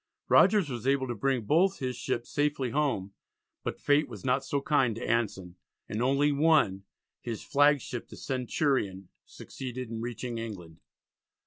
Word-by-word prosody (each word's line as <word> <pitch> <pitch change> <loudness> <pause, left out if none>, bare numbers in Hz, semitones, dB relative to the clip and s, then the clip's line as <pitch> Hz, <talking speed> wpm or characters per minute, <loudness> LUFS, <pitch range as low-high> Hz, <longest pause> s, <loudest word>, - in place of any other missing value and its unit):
Rogers 205 -7 +5
was 120 -2 -5
able 135 -1 +2
to - - -1
bring 125 +2 0
both 180 - +3
his 130 -1 -3
ships 120 0 -3
safely 145 -4 0
home, 125 -9 -1 0.5
but - - -4
fate 145 0 +2
was 110 -3 -9
not 130 +1 +2
so 140 - -1
kind 135 -5 +2
to 115 - -5
Anson, 95 -6 -1 0.3
and 110 - -3
only 140 +3 +3
one, 140 -11 +3 0.4
his 115 -3 -5
flagship 145 -4 +2
the - - -11
Centurion, 125 - -1 0.2
succeeded 125 -2 -7
in 115 -1 -4
reaching 120 0 -4
England. 90 -8 -8
125 Hz, 150 wpm, -29 LUFS, 115-145 Hz, 0.5 s, Rogers